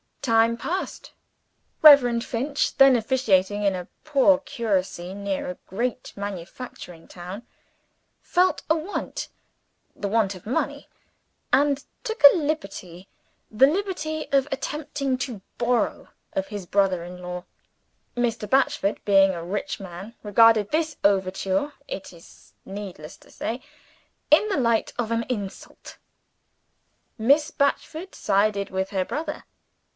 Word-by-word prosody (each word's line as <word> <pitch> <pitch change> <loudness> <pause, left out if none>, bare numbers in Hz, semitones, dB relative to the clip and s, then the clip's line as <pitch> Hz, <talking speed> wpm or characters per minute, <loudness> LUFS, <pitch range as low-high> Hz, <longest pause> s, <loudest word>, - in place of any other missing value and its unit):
Time 230 -2 +3
passed. 350 +11 -4 0.7
Reverend 245 -6 +8
Finch 275 +6 -1
then 270 -1 +7
officiating 210 -5 +1
in 200 -1 +3
a 180 -1 -6 0.2
poor 290 -1 +4
curacy 190 -8 -2
near 200 -2 -3
a 180 - -6
great 245 +6 -3
manufacturing 190 -2 -8
town 180 +5 -8 0.8
felt 365 +1 +2
a 320 - +5
want 330 +5 -4 0.7
(the 200 - -3
want 200 -2 +1
of 180 - -13
money); 235 - -2 0.7
and 280 -1 +3 0.2
took 445 -9 -5
a 285 - +10
liberty 195 - -4 0.4
(the 225 +5 +6
liberty 315 -2 -2
of 275 0 +3
attempting 275 -1 -2
to 240 -6 -4 0.2
borrow 240 -2 0 0.3
of 190 0 -2
his 205 -2 -6
brother 190 -2 +1
in 180 +1 -9
law). 180 0 -6 0.7
Mr. 235 -3 -1
Batchford, 270 -4 +1
being 195 -1 +5
a 170 -2 -5
rich 195 +4 -3
man, 195 +4 -9
regarded 215 0 +5
this 315 -1 0
overture, 195 +6 +1
it 190 -1 -7
is 170 -1 -18
needless 190 -6 -8
to - - -20
say, 240 +3 -4 0.7
in 320 +8 +5
the 395 - 0
light 235 -4 +1
of 230 -2 -1
an 230 0 0
insult. 205 -5 -6 1.2
Miss 285 +7 +3
Batchford 315 +5 -1
sided 200 0 +1
with 190 0 -2
her 190 -2 -1
brother. 300 - -5
225 Hz, 125 wpm, -24 LUFS, 195-280 Hz, 1.2 s, a